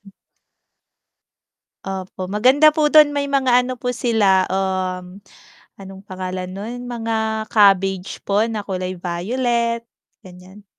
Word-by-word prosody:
dun. - - -17 1.7
Opo, 190 -1 -6
maganda 265 +8 +5
po 300 -1 +1
dun 300 -1 +6
may 285 0 -2
mga 260 -3 +2
ano 255 - -4
po 245 0 -4
sila, 220 -6 +2
um, 185 -1 -3 0.6
anong 195 0 -11
pangalan 185 0 -5
nun, 235 +6 -7
mga 220 -2 -2
cabbage 195 -3 +2
po 205 +2 +1
na 215 -3 -4
kulay 185 -1 -4
violet, 235 +7 -2 0.4
ganiyan. 185 +2 -15
205 Hz, 115 wpm, -20 LUFS, 185-245 Hz, 1.7 s, dun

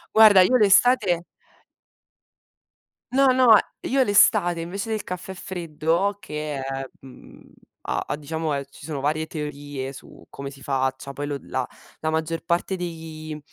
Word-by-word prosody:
Guarda, 215 -3 +8
io 255 +7 +4
l'estate 210 -4 +4 1.9
No, 270 +1 +4
no, 255 -3 +7 0.3
io 270 +1 +1
l'estate 200 -5 +4
invece 195 +6 -5
del 220 -2 -2
caffè 180 +1 -6
freddo 175 +2 -1
che 150 -4 -5
è, 135 0 -4 0.2
mhmm, 130 -1 -15 0.4
ha - - -2
ha - - -1
diciamo 155 +1 -3
è 140 -1 -3
ci 140 +1 -14
sono 150 -3 -4
varie 155 +3 -1
teorie 145 -3 -6
su 135 - -14
come 140 0 -7
si 140 -1 -14
faccia, 135 0 -2
poi 145 +1 -4
lo 145 -1 -3
la 130 -1 -3 0.3
la 155 - -1
maggior 160 +1 -2
parte 170 +3 0
dei 160 -3 -6
160 Hz, 145 wpm, -24 LUFS, 145-195 Hz, 1.9 s, Guarda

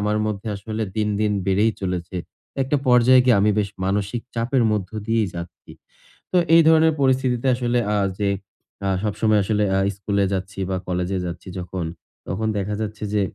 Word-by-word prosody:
আমার 105 +1 0
মধ্যে 105 +1 -3
আসলে 110 +2 -4
দিন, 105 -1 +1
দিন 105 -1 +2
বেড়েই 105 +4 +3
চলেছে। 90 -1 -3 0.5
একটা 135 +3 0
পর্যায়ে 125 +1 +6
গিয়ে 125 -4 +5
আমি 105 - +4
বেশ 100 -1 +1 0.2
মানসিক 100 +4 -1
চাপের 120 +2 +1
মধ্য 100 -4 -2 0.2
দিয়েই 115 -3 +1
যাচ্ছি। 85 0 -9 0.6
তো 180 - +3 0.2
এই 165 - +8
ধরনের 160 0 +5
পরিস্থিতিতে 130 -2 +2
আসলে 120 0 0 0.2
আ - - +2 0.2
যে 100 -1 +1 0.6
আ - - +1
সবসময় 105 0 +2
আসলে 105 +1 +1
আ - - +3 0.2
স্কুলে 100 0 0
যাচ্ছি 95 +1 -4
বা 95 - 0
কলেজে 90 +1 -1
যাচ্ছি 85 +1 -7
যখন, 90 -1 -4 0.4
তখন 110 +5 -2
দেখা 100 +1 -2
যাচ্ছে 105 0 -5
যে 105 - +2
105 Hz, 170 wpm, -22 LUFS, 95-120 Hz, 0.6 s, এই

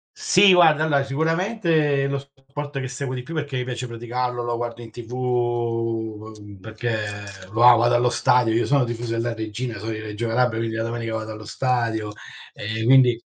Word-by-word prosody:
Sì 205 - +5
guarda, 160 -4 +5
allora 145 -3 +2
sicuramente 160 0 +1
è - - 0
lo 140 0 -1
sport 140 +1 -8
che 130 - -4
seguo 130 0 -4
di 125 - -4
più 145 +7 -10
perché 145 -4 -3
mi 125 - -1
piace 125 0 -4
praticarlo, 120 +1 -3
lo 120 0 -2
guardo 120 0 -5
in 115 - -10
TV, 120 +1 -10
uhm, 115 -4 -2
perché 110 +2 -3 0.6
va 120 +2 +7
vado 120 +1 +3
allo 120 +1 +3
stadio, 120 -1 +3
io 115 +2 +1
sono 140 -2 +3
tifoso 120 0 -4
della 115 +1 -1
Reggina, 110 +1 -5
sono 110 +2 -4
di 110 - -5
Reggio 110 +1 -4
Calabria, 115 0 +1
quindi 115 0 -2
la 115 - -1
domenica 115 0 -3
vado 110 0 -4
allo 110 -1 -10
stadio, 115 -2 -1 0.4
ehm, 110 +2 -4
quindi 125 -2 +5
120 Hz, 190 wpm, -23 LUFS, 115-135 Hz, 0.6 s, va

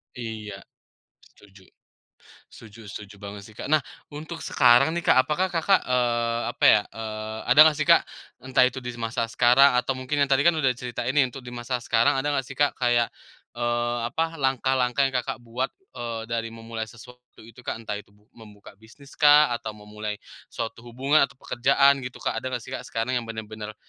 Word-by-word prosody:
Iya, 110 -4 -7 0.6
setuju. 100 -1 -20 0.9
Setuju 110 0 -14
setuju 100 0 -9
banget 100 0 -8
sih, 110 - -14
Kak. - - -6
Nah, 155 -2 +2 0.2
untuk 155 +3 -8
sekarang 130 +3 +4
nih, 175 - -2
Kak, 130 - +5
apakah 180 +5 0
Kakak, 180 +3 +2
eee, 120 -2 0
apa 120 - -5
ya, 105 - +7
eee, 110 0 -6
ada 125 - +5
nggak 155 - +1
sih, 155 - 0
Kak, - - +7 0.4
entah 130 0 +2
itu 125 +1 0
di 125 -1 -7
masa 115 0 -2
sekarang, 125 +4 +5
atau 125 +2 +1
mungkin 140 +3 0
yang 140 - -2
tadi 135 +4 +4
kan 170 - +4
udah 135 -5 +2
cerita 125 -1 -5
ini 130 +2 +2
untuk 130 +1 -10
di 125 - -9
masa 120 +1 -4
sekarang, 120 +6 +2
ada 140 +2 0
nggak 135 -2 -1
sih, 130 - -9
Kak, 145 +1 +2
kayak, 120 -2 +2 0.4
eee, 120 0 -1
apa, 165 +5 -3
langkah-langkah 130 -1 +1
yang - - -8
Kakak 125 0 -6
buat 120 +3 -2 0.6
dari, 115 0 -3
eee, 115 - -11
memulai 115 0 -6
sesuatu 125 +2 -16
itu, 115 +2 -15
Kak, 125 - -4
entah 105 -2 -4
itu 100 0 -18
bu 105 +3 -30
membuka 105 -3 -15
bisnis 125 +6 -17
kah, 150 -2 +6
atau 110 -2 -4
memulai 105 0 -6 0.3
suatu 115 0 -6
hubungan 135 +6 +2
atau 140 - -20
pekerjaan 140 +2 +3
gitu, 125 -1 -7
Kak, - - 0
ada - - -5
nggak 125 -3 -4
sih, - - -11
Kak, - - -6
sekarang 115 +2 -2
yang 115 - -9
bener-bener 110 -1 -7
120 Hz, 195 wpm, -25 LUFS, 115-135 Hz, 0.9 s, ya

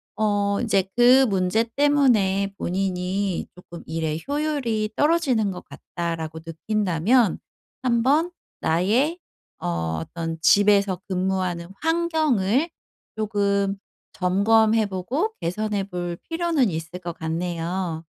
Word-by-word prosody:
어 205 -1 +1
인제 195 -5 +1
그 250 +2 +7
문제 195 +3 +1
때문에 230 -10 +3
본인이 185 +1 -2
조금 175 -1 -11
'일의 160 0 -3
효율이 280 -7 -1
떨어지는 285 -10 +2
것 180 - -8
같다.'라고 165 -2 -5
느낀다면 205 +5 +1 0.5
한번 265 +8 +2 0.3
나의 225 - +1 0.4
어 80 -2 -2
어떤 165 - -5
집에서 200 0 +4
근무하는 185 -2 -1 0.2
환경을 315 - +1 0.5
조금 200 -2 0 0.4
점검해 215 +4 +3
보고 255 - -2
개선해 205 +3 -2
볼 175 -2 -4
필요는 330 -7 +1
있을 165 +1 -5
것 175 -1 -5
같네요. 165 +1 -3
200 Hz, 230 characters per minute, -23 LUFS, 175-240 Hz, 0.5 s, 그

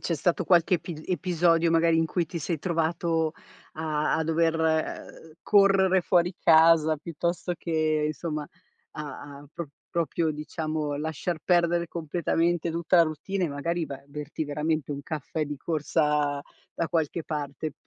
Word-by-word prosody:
C'è 170 - -1
stato 175 +3 0
qualche 175 +1 +4
epi 165 -2 -5
episodio 170 -1 +2
magari 165 0 +4
in 165 0 +2
cui 170 0 -1
ti 170 - -5
sei 160 +1 -2
trovato 165 -1 0 0.4
a 155 -1 -1
a 160 - 0
dover, 165 0 +1
ehm, 160 0 -2
correre 195 -2 +4
fuori 175 0 +2
casa, 160 -1 +5
piuttosto 170 +3 -3
che 155 -2 0
insomma, 155 -1 -3 0.5
a 150 -3 -7 0.2
a 145 - -14
pro 170 -4 -6 0.2
proprio, 165 -1 0
diciamo, 155 -1 -3
lasciar 160 +3 -3
perdere 170 -1 +2
completamente 170 +1 0
tutta 170 +2 +1
la 170 - +8
routine 180 +5 -3
e - - -1
magari 165 +4 -2
vai 140 - -6
a - - -20
berti 150 +2 -5
veramente 150 0 -1
un 140 - -6
caffè 155 +1 -3
di 145 0 -5
corsa 150 -2 0 0.3
da 165 - -1
qualche 165 -1 -1
parte. 150 0 -4
160 Hz, 150 wpm, -27 LUFS, 150-170 Hz, 0.5 s, la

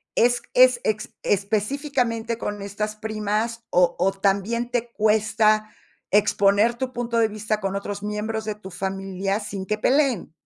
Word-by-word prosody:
es 240 +1 +3
es 255 -1 +6
ex 215 0 -2
específicamente 230 +3 0
con 205 -3 -4
estas 210 +2 -4
primas, 220 +2 -2
o 175 -1 +3
o 190 +2 +3
también 200 +5 0
te 240 -1 -1
cuesta 215 0 +2 0.4
exponer 205 +2 +3
tu 255 +1 -4
punto 235 -1 -2
de 225 - +4
vista 215 0 -2
con 195 -1 -2
otros 200 0 -4
miembros 215 +1 -3
de 215 -1 -3
tu 195 -2 -11
familia 195 +2 -2
sin 200 -2 -5
que 215 +2 -1
peleen? 260 - +1
215 Hz, 150 wpm, -24 LUFS, 200-230 Hz, 0.4 s, es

